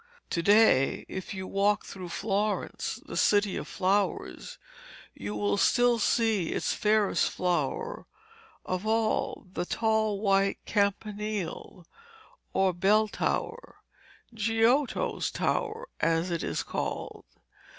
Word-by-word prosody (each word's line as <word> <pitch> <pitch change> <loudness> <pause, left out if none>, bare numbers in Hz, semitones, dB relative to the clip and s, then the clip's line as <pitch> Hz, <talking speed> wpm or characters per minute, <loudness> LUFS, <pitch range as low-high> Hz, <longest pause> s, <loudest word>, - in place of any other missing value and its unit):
To 170 - 0
day, 200 -8 +4
if 190 +1 -6
you 190 0 -5
walk 200 +2 +1
through 185 -2 -8
Florence, 205 +3 -2
the - - -8
City 205 -2 +3
of - - -5
Flowers, 195 0 -1 0.6
you 105 +1 -6
will 100 -1 0
still 245 - +3
see 220 -6 +2
its - - -1
fairest 210 -1 +2
flower 185 - -2 0.6
of 185 +3 -3
all, 220 -1 0
the - - -2
tall 220 +1 0
white 195 -1 +2
campanile 205 -3 -2 0.7
or 190 -1 +2
bell 210 +5 +3
tower, 480 - -3 0.6
'Giotto's 225 +5 +1
tower' 460 +1 -2
as 165 +2 +1
it 170 - -1
is - - -2
called. - - -4
205 Hz, 110 wpm, -28 LUFS, 185-220 Hz, 0.7 s, day